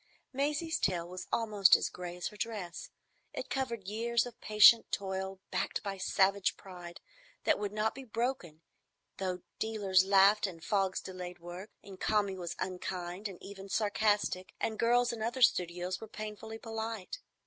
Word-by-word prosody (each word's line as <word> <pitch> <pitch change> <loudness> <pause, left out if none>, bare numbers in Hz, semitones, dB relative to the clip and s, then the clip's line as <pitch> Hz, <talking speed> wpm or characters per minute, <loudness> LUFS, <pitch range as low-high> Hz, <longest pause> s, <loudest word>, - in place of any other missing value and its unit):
Maisie's 300 +4 0
tale 175 -3 0
was 180 +1 -7
almost 215 -4 +5
as - - +1
gray 180 -1 -7
as 180 - -3
her - - -14
dress. 205 -5 -5 0.4
It - - -6
covered 235 -7 -2
years 230 +3 +1
of 245 -2 -10
patient 215 +2 +7
toil 190 -1 -3
backed - - -1
by 195 -2 -4
savage 195 +1 +2
pride 175 -2 -10 0.4
that - - +3
would 205 -1 -2
not 215 +1 0
be 270 - -8
broken 230 -9 -3 0.6
though 185 -2 -3 0.2
dealers 200 -4 +3
laughed, 200 +2 +5
and 170 -3 -9
fogs 195 -3 +1
delayed 180 -1 -7
work, 175 +4 -8
and 195 -2 -11
Kami 205 -3 +1
was 175 -2 -5
unkind 180 +1 -4
and 190 -3 -9
even 195 0 -9
sarcastic, 205 -3 +1
and 220 -1 -2
girls 240 +1 +3
in 225 - -6
other 240 +3 0
studios 180 -2 +2
were 220 - -7
painfully 215 +1 -7
polite. 225 - -5
200 Hz, 160 wpm, -32 LUFS, 185-220 Hz, 0.6 s, patient